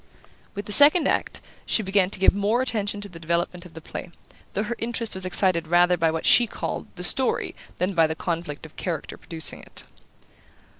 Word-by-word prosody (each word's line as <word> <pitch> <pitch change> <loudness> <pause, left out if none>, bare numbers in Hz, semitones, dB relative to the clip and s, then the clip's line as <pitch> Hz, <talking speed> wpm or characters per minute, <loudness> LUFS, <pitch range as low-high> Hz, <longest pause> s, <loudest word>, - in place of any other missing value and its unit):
With 205 0 -5
the 210 - -7
second 295 - +7
act - - -1 0.2
she 220 - 0
began 190 -1 +2
to - - -1
give 190 - +4
more 210 +5 +1
attention 205 -4 -1
to 205 - -6
the 175 -4 -12
development 170 +2 -2
of 165 - -21
the 160 - -9
play, 175 - -7 0.5
though 205 - 0
her 225 +3 -4
interest 230 -1 -1
was 190 -1 -3
excited 180 -3 +1
rather 175 +1 +4
by 165 -1 +1
what 160 0 -3
she 240 - +6
called - - -5
"the 180 - -4
story" 260 +8 +1 0.2
than 185 +2 -1
by 165 -3 +4
the 160 - -3
conflict 165 -3 -4
of 155 - -14
character 170 -5 -4
producing 160 -6 -2
it. - - -5
185 Hz, 200 wpm, -24 LUFS, 170-205 Hz, 0.5 s, second